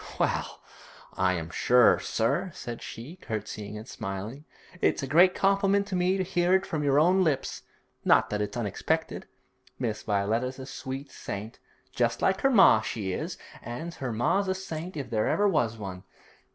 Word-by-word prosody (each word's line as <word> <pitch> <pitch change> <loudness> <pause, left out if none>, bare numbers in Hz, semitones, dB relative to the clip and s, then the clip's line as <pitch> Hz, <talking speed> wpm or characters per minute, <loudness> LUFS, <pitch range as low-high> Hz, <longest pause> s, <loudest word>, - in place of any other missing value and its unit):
'Well, - - -1 0.5
I 95 0 +2
am 80 -2 -4
sure, 125 +4 +5
sir,' 140 +12 0
said 120 -1 -6
she, 130 +10 -8
curtseying 105 - -5
and 110 +3 -9
smiling. 105 +8 -6 0.4
'It's - - +2
a - - -2
great 175 +6 +5
compliment 195 0 +2
to 190 - -2
me 180 +1 +2
to 190 - 0
hear 175 0 +2
it 190 +1 +1
from 155 -2 -2
your 140 0 +4
own 180 +4 +4
lips; 150 -6 -1 0.4
not - - +4
that 105 0 -1
it's 105 +2 -3
unexpected. 105 -5 -2 0.5
Miss 110 -4 -2
Violetta's 110 +6 -1
a 130 - -7
sweet 135 +1 -6
saint, 105 +3 -7 0.3
just - - +1
like 190 0 +1
her 270 - +4
ma, 195 - +7
she 105 -3 -3
is, - - -4 0.2
an' 135 +9 -6
her 130 -7 -5
ma's 155 - +1
a 190 - 0
saint 180 -2 -6
if 135 -4 -5
there 110 -1 +1
ever 205 - +3
was 120 - +1
one. 95 -3 -6
130 Hz, 175 wpm, -28 LUFS, 110-180 Hz, 0.5 s, ma